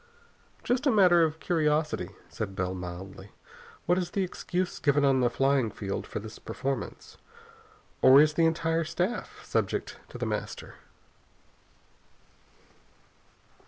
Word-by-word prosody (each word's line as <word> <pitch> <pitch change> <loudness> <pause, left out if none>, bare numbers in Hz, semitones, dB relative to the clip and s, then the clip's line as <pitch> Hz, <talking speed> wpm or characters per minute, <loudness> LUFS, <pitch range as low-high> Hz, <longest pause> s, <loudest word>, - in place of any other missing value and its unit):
"Just 255 +4 0
as - - +5
a - - +1
matter 180 -4 +6
of 160 0 -1
curiosity," 155 -2 0 0.2
said 100 -3 -5
Bell 90 0 -2
mildly, 95 +2 -8 0.6
"what 175 +2 +3
is 180 - -3
the 195 - -1
excuse 180 0 -3
given 145 -1 +3
on 135 -1 +4
the 125 -1 +3
flying 135 -1 +2
field 100 -2 -5
for - - -6
this 110 +1 -8
performance? 135 0 -5 0.8
Or 130 +2 +8
is 155 +1 +5
the 165 +1 +3
entire 165 0 0
staff 180 +8 -3
subject - - -2
to - - -9
The - - -3
Master?" - - -4
150 Hz, 130 wpm, -28 LUFS, 115-175 Hz, 0.8 s, Or